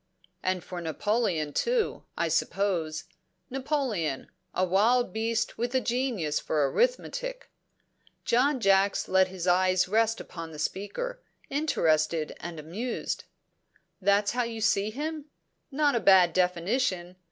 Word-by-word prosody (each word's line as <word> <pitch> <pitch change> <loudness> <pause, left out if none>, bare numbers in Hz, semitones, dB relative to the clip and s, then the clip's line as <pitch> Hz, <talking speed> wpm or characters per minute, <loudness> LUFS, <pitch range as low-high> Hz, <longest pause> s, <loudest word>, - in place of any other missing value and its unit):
"And 185 -2 -1
for 180 -1 -6
Napoleon, 170 -2 0
too, 475 -2 0
I - - +1
suppose. 170 -6 0 0.5
Napoleon 255 - -2 0.2
a 185 - +1
wild 210 +4 +3
beast 225 0 -1
with 240 +2 -1
a - - +5
genius 240 - -1
for 150 -3 +1
arithmetic." - - -1 0.7
John 260 +3 +3
Jacks 195 -2 +3
let 190 0 +4
his 185 -2 -6
eyes 185 0 +3
rest 225 +3 +2
upon 165 -2 -8
the - - -9
speaker, 205 - -3 0.3
interested 160 - +1
and 170 -2 -7
amused. 200 +11 -4 0.8
"That's 200 +2 +3
how 245 - 0
you 230 -1 -3
see 210 -2 +2
him? 300 +5 -4 0.4
Not 290 0 +2
a 235 - +2
bad 185 -5 +6
definition. 180 0 0
200 Hz, 125 wpm, -28 LUFS, 175-250 Hz, 0.8 s, bad